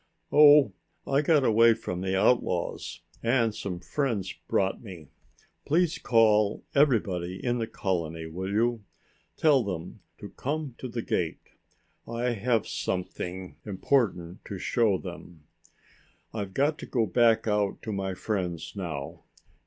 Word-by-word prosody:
"Oh, 150 Hz, -1 st, +7 dB, 0.3 s
I 140 Hz, +1 st, +2 dB
got 150 Hz, -2 st, +3 dB
away 115 Hz, 0 st, +5 dB
from 90 Hz, -5 st, -5 dB
the 95 Hz, 0 st, 0 dB
outlaws 95 Hz, -7 st, 0 dB, 0.2 s
and 115 Hz, -2 st, +2 dB
some 95 Hz, -4 st, -5 dB
friends 110 Hz, -2 st, -2 dB
brought 95 Hz, 0 st, 0 dB
me. 90 Hz, -9 st, -11 dB, 0.5 s
Please 170 Hz, +2 st, +1 dB
call 110 Hz, -3 st, +3 dB
everybody 100 Hz, -, +2 dB
in 120 Hz, 0 st, +1 dB
the 115 Hz, -, -2 dB
colony, 85 Hz, -6 st, -3 dB
will 90 Hz, +4 st, -5 dB
you? 115 Hz, +1 st, +1 dB, 0.5 s
Tell 145 Hz, -5 st, +4 dB
them 90 Hz, -5 st, -5 dB, 0.2 s
to -, -, -9 dB
come 145 Hz, -1 st, -4 dB
to 130 Hz, -, -5 dB
the 115 Hz, -1 st, -4 dB
gate. 85 Hz, -3 st, -2 dB, 0.6 s
I 120 Hz, +1 st, -1 dB
have 115 Hz, 0 st, 0 dB
something 90 Hz, 0 st, -4 dB
important 95 Hz, -4 st, 0 dB
to 100 Hz, -, -6 dB
show 110 Hz, 0 st, +2 dB
them. 85 Hz, -3 st, -10 dB, 0.9 s
I've 100 Hz, -3 st, -5 dB
got 150 Hz, +3 st, +1 dB
to -, -, -8 dB
go 120 Hz, -4 st, +1 dB
back 115 Hz, +2 st, +3 dB
out 105 Hz, -2 st, 0 dB
to 110 Hz, -, -4 dB
my 95 Hz, -2 st, -3 dB
friends 90 Hz, -6 st, -3 dB
now. 80 Hz, -8 st, -5 dB
105 Hz, 135 wpm, -27 LUFS, 90-120 Hz, 0.9 s, Oh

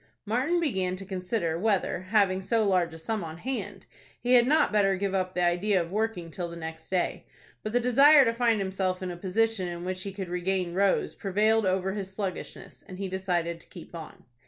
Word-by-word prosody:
Martin 260 Hz, +11 st, +1 dB
began 190 Hz, -, 0 dB
to 195 Hz, +1 st, -9 dB
consider 180 Hz, -3 st, -2 dB
whether, 195 Hz, -3 st, 0 dB
having 195 Hz, -3 st, +3 dB
so 215 Hz, +2 st, +1 dB
large 180 Hz, -3 st, +2 dB
a 160 Hz, -, -9 dB
sum 210 Hz, +5 st, -3 dB
on 160 Hz, 0 st, -7 dB
hand, 205 Hz, -2 st, -5 dB, 0.3 s
he 245 Hz, +1 st, +1 dB
had 245 Hz, -1 st, +6 dB
not 310 Hz, +3 st, +3 dB
better 200 Hz, -2 st, +3 dB
give 195 Hz, 0 st, -2 dB
up 185 Hz, -1 st, -1 dB
the 180 Hz, -, +1 dB
idea 180 Hz, +3 st, +2 dB
of 170 Hz, 0 st, -3 dB
working 210 Hz, -5 st, -2 dB
till 175 Hz, +1 st, -4 dB
the 170 Hz, -, -8 dB
next 160 Hz, -1 st, -8 dB
day; 185 Hz, -2 st, -1 dB, 0.4 s
but 215 Hz, -, -4 dB
the 245 Hz, -, +3 dB
desire 275 Hz, +4 st, +7 dB
to 230 Hz, -, +1 dB
find 230 Hz, -2 st, +2 dB
himself 190 Hz, -1 st, -2 dB
in 180 Hz, -, -3 dB
a -, -, -6 dB
position 195 Hz, +2 st, 0 dB
in 175 Hz, 0 st, -6 dB
which 185 Hz, 0 st, -3 dB
he 195 Hz, -, -5 dB
could 190 Hz, -1 st, -6 dB
regain 180 Hz, 0 st, -1 dB
Rose 195 Hz, +1 st, +1 dB
prevailed 210 Hz, +2 st, +1 dB
over 190 Hz, +1 st, 0 dB
his 195 Hz, -2 st, -4 dB
sluggishness, 190 Hz, -1 st, -6 dB
and 185 Hz, -, -9 dB
he 195 Hz, 0 st, -3 dB
decided 175 Hz, -3 st, -2 dB
to -, -, -17 dB
keep 175 Hz, -, -12 dB
on. 165 Hz, -2 st, -9 dB
190 Hz, 210 wpm, -28 LUFS, 180-215 Hz, 0.4 s, desire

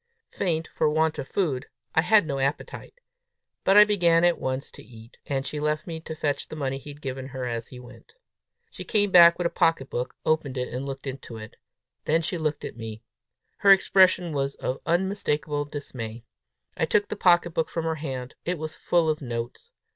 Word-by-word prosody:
Faint 165 Hz, -4 st, -1 dB
for 155 Hz, -, +1 dB
want 155 Hz, +1 st, +1 dB
of 130 Hz, -, -5 dB
food, 150 Hz, -10 st, -1 dB, 0.3 s
I 160 Hz, -, +4 dB
had 210 Hz, +1 st, +4 dB
no 140 Hz, -3 st, -3 dB
appetite. 140 Hz, +2 st, -3 dB, 0.7 s
But 195 Hz, +2 st, +5 dB
I 210 Hz, -, +11 dB
began 175 Hz, -5 st, +3 dB
at 175 Hz, -1 st, +3 dB
once 130 Hz, +1 st, -3 dB
to -, -, -13 dB
eat, 115 Hz, +1 st, -15 dB
and 135 Hz, -1 st, -1 dB
she 150 Hz, -, -4 dB
left 150 Hz, +1 st, -1 dB
me 165 Hz, -2 st, -5 dB
to 160 Hz, 0 st, -7 dB
fetch 145 Hz, -2 st, -2 dB
the -, -, -8 dB
money 135 Hz, -3 st, -2 dB
he 145 Hz, -, -11 dB
had 145 Hz, 0 st, -11 dB
given 130 Hz, -1 st, -4 dB
her 130 Hz, -2 st, -5 dB
as 115 Hz, -1 st, -3 dB
he 125 Hz, -, -11 dB
went. 125 Hz, -, -15 dB, 0.6 s
She -, -, -7 dB
came 205 Hz, -3 st, +1 dB
back 170 Hz, -1 st, +8 dB
with 175 Hz, -, -2 dB
a 170 Hz, -, +1 dB
pocket 165 Hz, -5 st, +1 dB
book, 125 Hz, +1 st, -3 dB
opened 155 Hz, -4 st, 0 dB
it, 125 Hz, 0 st, -3 dB
and 130 Hz, +3 st, -4 dB
looked 135 Hz, 0 st, -6 dB
into 130 Hz, -4 st, -7 dB
it. 110 Hz, -1 st, -10 dB, 0.5 s
Then 165 Hz, +2 st, +2 dB
she 175 Hz, +1 st, -2 dB
looked 155 Hz, -1 st, -2 dB
at -, -, -7 dB
me. 110 Hz, -1 st, -7 dB, 0.6 s
Her 200 Hz, -, +4 dB
expression 185 Hz, -3 st, +4 dB
was 140 Hz, -1 st, -1 dB
of 130 Hz, -, -3 dB
unmistakable 155 Hz, -6 st, 0 dB
dismay. 120 Hz, -6 st, -7 dB, 0.5 s
I -, -, +1 dB
took 205 Hz, +5 st, +1 dB
the -, -, -3 dB
pocket 175 Hz, -3 st, +4 dB
book 160 Hz, 0 st, -1 dB
from 165 Hz, -1 st, -3 dB
her 160 Hz, -, 0 dB
hand: 130 Hz, -4 st, -5 dB
it 180 Hz, +1 st, -2 dB
was 155 Hz, 0 st, -5 dB
full 170 Hz, -2 st, +1 dB
of 155 Hz, -1 st, 0 dB
notes! 120 Hz, -, -5 dB
150 Hz, 205 wpm, -26 LUFS, 130-170 Hz, 0.7 s, I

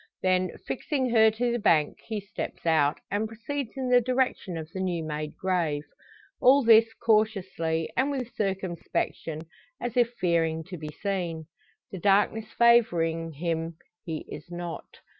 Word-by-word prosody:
Then, 185 Hz, -1 st, +1 dB
fixing 260 Hz, -2 st, -1 dB
her 220 Hz, -1 st, +6 dB
to 240 Hz, +3 st, -1 dB
the 240 Hz, -, 0 dB
bank, 160 Hz, -8 st, +2 dB
he 220 Hz, -2 st, -3 dB
steps 200 Hz, -3 st, -7 dB
out, 155 Hz, -3 st, +3 dB
and 210 Hz, +2 st, 0 dB
proceeds 235 Hz, +3 st, -5 dB
in 260 Hz, -1 st, -2 dB
the 245 Hz, 0 st, +6 dB
direction 250 Hz, -7 st, 0 dB
of 160 Hz, -1 st, -6 dB
the 190 Hz, -, -6 dB
new 180 Hz, -3 st, -1 dB
made 150 Hz, -1 st, -4 dB
grave. 170 Hz, -6 st, 0 dB, 0.6 s
All 270 Hz, +2 st, +6 dB
this 225 Hz, 0 st, +6 dB
cautiously, 195 Hz, -8 st, +1 dB
and 265 Hz, +3 st, +2 dB
with 255 Hz, -4 st, -4 dB
circumspection, 185 Hz, -5 st, -2 dB, 0.4 s
as 240 Hz, -2 st, -4 dB
if 240 Hz, -2 st, +4 dB
fearing 165 Hz, -5 st, 0 dB
to 180 Hz, -, -6 dB
be 155 Hz, -1 st, -6 dB
seen. 175 Hz, -4 st, -3 dB, 0.5 s
The 190 Hz, -, -6 dB
darkness 205 Hz, +3 st, +2 dB
favouring 165 Hz, -9 st, +3 dB
him, 165 Hz, +1 st, -2 dB, 0.3 s
he 160 Hz, -2 st, -5 dB
is 150 Hz, -, -9 dB
not. 175 Hz, -1 st, -6 dB
190 Hz, 150 wpm, -27 LUFS, 165-230 Hz, 0.6 s, her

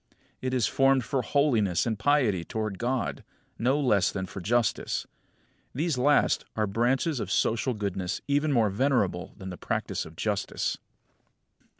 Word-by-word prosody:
It 130 Hz, -, -2 dB
is 120 Hz, -4 st, +2 dB
formed 135 Hz, +1 st, +3 dB
for 135 Hz, +2 st, -1 dB
holiness 115 Hz, -, +2 dB
and 110 Hz, -3 st, -2 dB
piety 110 Hz, -, +2 dB
toward 110 Hz, 0 st, -4 dB
God, 125 Hz, +1 st, -2 dB, 0.4 s
no 130 Hz, +5 st, +2 dB
less 105 Hz, -9 st, +3 dB
than 95 Hz, -2 st, -3 dB
for 95 Hz, +1 st, -8 dB
justice. 120 Hz, +5 st, 0 dB, 0.7 s
These 160 Hz, +2 st, 0 dB
last 145 Hz, +3 st, +3 dB
are 110 Hz, -, +1 dB
branches 125 Hz, -, +1 dB
of 100 Hz, -, -4 dB
social 115 Hz, +4 st, +1 dB
goodness 95 Hz, -3 st, -3 dB
even 145 Hz, +2 st, +2 dB
more 115 Hz, -6 st, +3 dB
venerable 100 Hz, -6 st, 0 dB
than 95 Hz, -2 st, -7 dB
the 90 Hz, -, -7 dB
practice -, -, -2 dB
of 80 Hz, -, -12 dB
justice. 105 Hz, +3 st, -2 dB
115 Hz, 150 wpm, -27 LUFS, 100-135 Hz, 0.7 s, formed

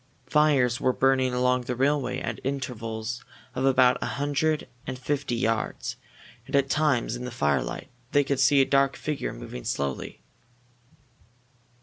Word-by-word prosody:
Fires 135 Hz, -3 st, +3 dB
were 130 Hz, -, +2 dB
burning 130 Hz, -1 st, +2 dB
along 125 Hz, 0 st, +2 dB
the 125 Hz, -, -2 dB
railway 135 Hz, -1 st, +1 dB
at -, -, -4 dB
intervals 120 Hz, -3 st, -4 dB, 0.3 s
of 130 Hz, -, -1 dB
about 130 Hz, -2 st, +4 dB
a -, -, -1 dB
hundred 145 Hz, +2 st, 0 dB, 0.2 s
and 130 Hz, -, -4 dB
fifty 135 Hz, -1 st, -2 dB
yards, 115 Hz, -2 st, -1 dB, 0.5 s
and -, -, -2 dB
at 140 Hz, -1 st, +2 dB
times, 145 Hz, -7 st, +1 dB
in 120 Hz, -, -6 dB
the 125 Hz, -, -4 dB
firelight, 75 Hz, -, -1 dB, 0.2 s
they 145 Hz, -, +4 dB
could 140 Hz, -1 st, -1 dB
see 135 Hz, +1 st, +5 dB
a -, -, +4 dB
dark 135 Hz, 0 st, +3 dB
figure 150 Hz, -2 st, -3 dB
moving 60 Hz, -, -8 dB
slowly. 70 Hz, -2 st, -3 dB
130 Hz, 145 wpm, -26 LUFS, 125-140 Hz, 0.5 s, see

